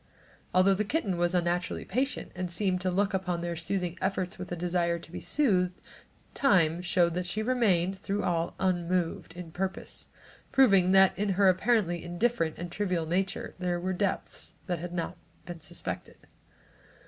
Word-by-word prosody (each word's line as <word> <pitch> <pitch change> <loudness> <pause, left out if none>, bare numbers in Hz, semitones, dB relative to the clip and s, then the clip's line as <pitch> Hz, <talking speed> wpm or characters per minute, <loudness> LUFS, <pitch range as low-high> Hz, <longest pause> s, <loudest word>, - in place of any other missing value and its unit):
Although 185 +2 +5
the 200 +2 0
kitten 210 - -1
was 175 +1 +1
unnaturally 175 0 0
patient 260 +7 -1
and 185 -1 -3
seemed 185 +1 0
to 185 - 0
look 195 +2 +1
upon 180 -2 -1
their 170 0 -2
soothing 180 +1 -2
efforts 190 -2 -1
with 180 - -7
a - - -1
desire 170 0 0
to 165 -1 -11
be - - -5
soothed, 185 -11 +1 0.5
time 175 - +3
showed 175 -1 +2
that 180 +1 -2
she 215 +4 -1
remained, 195 -7 +2
through 200 +2 -2
all, 170 -1 0
unmoved 175 -2 0
in 175 -1 -8
purpose, 190 +3 -4 0.4
proving 195 -9 +5
that 190 -1 +6
in 210 0 +1
her 195 +1 +5
apparently 185 -3 +2
indifferent 175 -2 0
and 175 0 -6
trivial 180 -4 -1
nature 185 +4 -1
there 180 -1 -1
were 185 +2 -1
depths 195 +1 -3
that 175 -2 -2
had 175 +1 -5
not 175 +1 -3 0.3
been 175 -1 -7
suspected. - - -7
180 Hz, 165 wpm, -29 LUFS, 175-195 Hz, 0.5 s, that